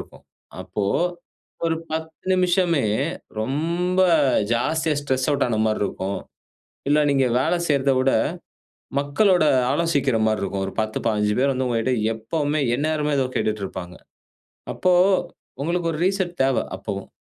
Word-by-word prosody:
இருக்கும். - - -13 0.4
அப்போ 105 - -3 0.8
ஒரு 165 0 0
10 160 0 -5
நிமிஷமே 175 - +2 0.6
ரொம்ப 170 +9 0 0.5
ஜாஸ்தியா, 155 +6 0
ஸ்ட்ரெஸ் 130 0 -1
அவுட் 140 -1 +1
ஆன 110 -2 0
மாரி 110 -1 0
இருக்கும். 95 0 -3 0.7
இல்ல 150 - +4
நீங்க 135 -2 +3
வேலை 175 +6 +1
செய்றத 140 -2 +2
விட, 130 +1 +2 0.9
மக்களோட 165 +6 +3 0.3
ஆலோசிக்கிற 145 -5 +1
மாரி 110 -1 +1
இருக்கும். 100 0 -2
ஒரு 95 - -6
10, 110 0 -2
15 105 -1 +1
பேர் 135 +1 +3
வந்து 130 0 -1
உங்ககிட்ட 115 +2 0 0.2
எப்பவுமே 145 +7 -1 0.2
எந்நேரமே 150 +1 0
ஏதோ 130 - +2
கேட்டுட்டுருப்பாங்க. 95 -4 -3 0.8
அப்போ 185 -1 +2 0.7
உங்களுக்கு 170 +1 0
ஒரு 155 - -5
ரீசெட் 190 -2 -1
தேவ. 135 -1 +2 0.2
அப்பவும். - - -6
140 Hz, 130 wpm, -23 LUFS, 115-165 Hz, 0.9 s, இல்ல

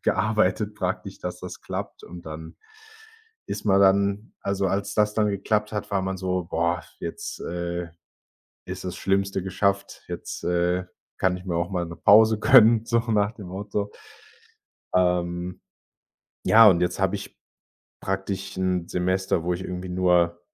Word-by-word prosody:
gearbeitet 105 -1 +1
praktisch, 95 -2 -3
dass - - -5
das - - -8
klappt. - - -6
Und 85 -1 -11
dann 80 +1 -8 0.9
ist - - -5
man 100 -2 +4
dann 100 +2 +3
also, 100 0 -1
als 100 +1 -2
das 105 -1 +2
dann 105 -1 +2
geklappt 105 +2 -1
hat, 105 - -4
war 95 - +1
man 95 0 -2
so: 90 -1 -2
„Boah, 85 +1 0 0.2
jetzt, - - -6
äh, 85 0 -4 0.8
ist - - -6
das 90 - -4
Schlimmste 95 -1 0
geschafft. 100 +1 -1
Jetzt, - - -6
äh, 90 +1 +1 0.3
kann 95 -1 +2
ich 90 - -13
mir 85 - -2
auch 85 +2 -1
mal 90 -3 -1
'ne 85 - -9
Pause 110 +4 +6
gönnen,“ 115 -1 +6
so 115 - +2
nach 105 0 +2
dem 105 -4 -10
Motto. 100 +2 -3 1.0
Ähm, 90 0 0 0.8
ja, 110 0 +8
und 90 -3 +4
jetzt 90 - 0
habe 95 +1 +1
ich - - -9 0.6
praktisch 95 0 -3
'n 90 -2 -1
Semester, 95 -1 0
wo 90 - 0
ich 90 - -5
irgendwie 90 0 -5
nur 90 -1 +2
95 Hz, 155 wpm, -25 LUFS, 90-100 Hz, 1.0 s, ja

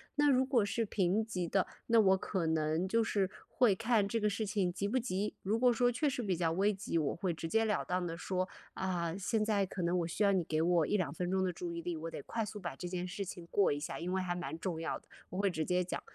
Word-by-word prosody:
那 295 0 +4
如 260 -1 +5
果 255 -5 +2
是 230 +3 0
平 200 0 +1
级 185 -6 -3
的， 195 +2 +1 0.2
那 230 -1 +5
我 190 -2 +5
可 185 -3 -2
能 160 +2 +1
就 230 +4 +2
是 200 -4 +1 0.2
会 245 -6 +4
看 225 0 +2
这 230 +3 0
个 210 -1 +2
事 215 +2 -2
情 195 -3 0
急 200 +2 -1
不 235 +6 +1
急， 210 -4 -1
如 210 +4 +1
果 250 0 +5
说 245 +1 +3
确 290 +5 +1
实 255 - -2
比 195 -4 0
较 165 -1 +1
危 195 +5 +2
急， 190 -3 -2
我 150 -3 0
会 180 0 -1
直 165 0 -5
截 225 +7 +2
了 215 -1 0
当 180 0 -1
地 165 -1 -4
说： 185 +1 -2 0.2
“啊， 175 -3 -2
现 215 +3 0
在 205 -2 +2
可 180 -1 -4
能 170 +1 +2
我 170 - -1
需 170 +5 -1
要 200 - +5
你 190 -3 +2
给 155 0 0
我 170 -2 +3
1-2 190 -5 0
分 180 +1 -2
钟 190 0 +1
的 185 -1 0
注 175 0 -5
意 170 0 -4
力， 175 0 -3
我 165 +1 -5
得 - - -6
快 230 - -2
速 210 0 -6
把 175 -7 -5
这 175 - -5
件 180 0 -3
事 190 +2 -4
情 175 -2 -8
过 200 - +4
一 145 - -1
下， 150 - -5
因 175 +2 -3
为 190 - +1
还 180 -1 -1
蛮 175 -2 -4
重 165 -2 -3
要 165 - -2
的”， - - -30 0.2
我 180 - -6
会 200 0 +3
直 160 -3 -1
接 180 +3 +1
讲。 180 - -4
190 Hz, 295 characters per minute, -33 LUFS, 175-210 Hz, 0.2 s, 如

